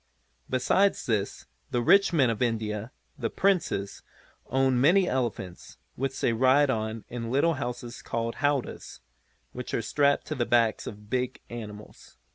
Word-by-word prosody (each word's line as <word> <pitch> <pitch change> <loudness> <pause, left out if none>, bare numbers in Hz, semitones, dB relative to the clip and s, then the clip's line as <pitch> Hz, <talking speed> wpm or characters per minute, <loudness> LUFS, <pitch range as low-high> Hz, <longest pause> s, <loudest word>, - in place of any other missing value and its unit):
Besides 190 +10 +2
this 105 -4 -1 0.2
the 120 -1 0
rich 195 +10 +5
men 135 -8 +3
of 110 - -5
India, 110 -1 -1 0.3
the 115 - -1
Princes, 175 - 0 0.5
own 130 -1 +2
many 180 +6 +5
elephants, 115 - -3 0.2
which 135 +1 -3
they 115 - +2
ride 130 +4 +4
on 110 -1 -3
in 115 -1 -5
little 140 +7 +3
houses, 120 -3 -5
called 115 0 -3
howdahs 145 -2 -2 0.5
which 125 0 -5
are - - 0
strapped 140 +4 +2
to - - -3
the 120 -2 -1
backs 115 -2 +2
of - - -5
the 105 - -17
big 125 +4 -2
animals. 105 -3 -10
120 Hz, 150 wpm, -27 LUFS, 115-135 Hz, 0.5 s, rich